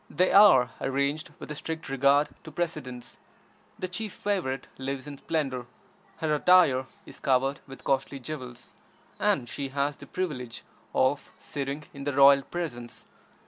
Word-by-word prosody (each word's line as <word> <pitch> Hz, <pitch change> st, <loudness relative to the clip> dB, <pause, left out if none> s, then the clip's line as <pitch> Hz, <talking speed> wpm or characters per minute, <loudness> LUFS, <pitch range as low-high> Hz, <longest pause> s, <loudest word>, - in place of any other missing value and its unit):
They 180 Hz, +5 st, +2 dB
are 180 Hz, -11 st, +7 dB
arranged 140 Hz, +3 st, -1 dB
with -, -, -9 dB
a -, -, -2 dB
strict 160 Hz, +2 st, -5 dB
regard 140 Hz, +2 st, +3 dB
to 160 Hz, -, -9 dB
precedence. 140 Hz, -7 st, -5 dB, 0.6 s
The 185 Hz, -, -3 dB
chief 205 Hz, +3 st, -4 dB
favorite 175 Hz, -11 st, -2 dB
lives 135 Hz, 0 st, -4 dB
in 145 Hz, -1 st, -8 dB
splendor, 135 Hz, -7 st, -2 dB, 0.5 s
her 155 Hz, -1 st, 0 dB
attire 150 Hz, -5 st, +5 dB, 0.2 s
is -, -, -12 dB
covered 135 Hz, +1 st, +1 dB
with 135 Hz, 0 st, -11 dB
costly 135 Hz, +1 st, 0 dB
jewels, 125 Hz, -4 st, -8 dB, 0.5 s
and 120 Hz, -, +1 dB
she 140 Hz, +4 st, -4 dB
has 140 Hz, +1 st, -1 dB
the -, -, -12 dB
privilege 125 Hz, -11 st, -4 dB, 0.3 s
of 130 Hz, +2 st, +1 dB
sitting 140 Hz, +1 st, -4 dB
in 140 Hz, 0 st, -8 dB
the 145 Hz, -, -1 dB
royal 140 Hz, 0 st, +7 dB
presence. 135 Hz, -8 st, -6 dB
140 Hz, 145 wpm, -28 LUFS, 130-155 Hz, 0.6 s, are